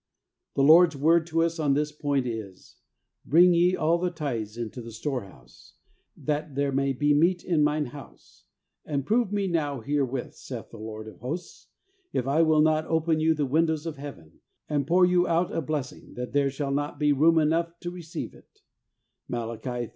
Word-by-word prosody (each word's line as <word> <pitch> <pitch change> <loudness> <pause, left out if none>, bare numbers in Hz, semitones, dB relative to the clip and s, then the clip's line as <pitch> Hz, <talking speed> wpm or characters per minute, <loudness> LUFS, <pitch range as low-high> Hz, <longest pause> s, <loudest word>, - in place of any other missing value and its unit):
The 135 - +2
Lord's 160 +2 +7
word 160 +4 +3
to 165 0 +1
us 165 0 -1
on 145 -3 +2
this 150 +1 0
point 145 -3 -1
is, 110 -6 -7 0.2
' - - -54 0.2
Bring 175 +4 +6
ye 175 +2 +3
all 165 +1 +1
the 180 +1 0
tithes 120 -10 -4
into 120 +1 -5
the 115 0 -9
storehouse, 110 - -7 0.4
that 150 -1 -3
there 140 0 0
may 135 0 +1
be 145 +3 +2
meat 170 +4 +2
in 160 -4 +2
Mine 150 0 +1
house; 135 0 -13 0.4
and 140 -3 -3
prove 225 +1 +1
me 205 -1 0
now 150 -7 -1
herewith, 135 -1 -2
saith - - -9
the - - -11
Lord 110 0 -7
of 105 -5 -12
Hosts, 155 - -6 0.5
if 125 - 0
I 140 +4 +2
will 155 -1 +4
not 155 0 +2
open 160 0 +1
you 160 +1 +3
the 150 -2 0
windows 160 +2 +1
of 160 -3 -5
Heaven, 135 - -10 0.3
and 145 -2 -1
pour 180 +2 +5
you 180 0 +3
out 170 +1 +1
a 165 - 0
blessing, 145 -3 -5
that 125 0 -6
there 140 -1 +2
shall 140 0 -3
not 145 +1 -2
be 150 0 +3
room 160 +4 +4
enough 165 +2 +1
to 175 - -4
receive 170 -2 -7
it - - -21 0.3
' - - -54
(Mai. 120 +1 -4
150 Hz, 190 wpm, -26 LUFS, 135-165 Hz, 0.5 s, Lord's